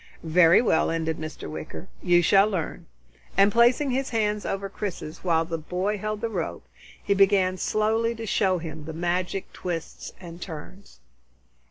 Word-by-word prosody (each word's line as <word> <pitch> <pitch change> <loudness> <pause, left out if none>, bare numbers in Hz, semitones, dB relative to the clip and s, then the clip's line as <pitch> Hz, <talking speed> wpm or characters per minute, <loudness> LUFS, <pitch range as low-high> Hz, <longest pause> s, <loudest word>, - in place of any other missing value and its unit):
"Very 165 +4 +5
well," 160 - +2
ended 160 -1 -1
Mr. 155 0 -6
Wicker, 155 +4 -7
"you 175 -1 +4
shall 195 +4 +5
learn." 185 -6 -4 0.5
And 200 +1 +6
placing 240 +5 +4
his 265 +1 -1
hands 210 -3 0
over 195 0 -2
Chris's 185 -5 -6
while 165 -2 +2
the 165 0 -4
boy 185 +6 -2
held 215 +1 -3
the 230 - -1
rope, - - -4 0.4
he 200 - +2
began 195 -2 +4
slowly 220 +4 0
to 225 0 -6
show 190 -3 +2
him 160 -2 -7
the 160 - -6
magic 175 +3 -2
twists 170 -3 -5
and 175 -1 -10
turns. 185 +4 -10
185 Hz, 160 wpm, -25 LUFS, 165-210 Hz, 0.5 s, And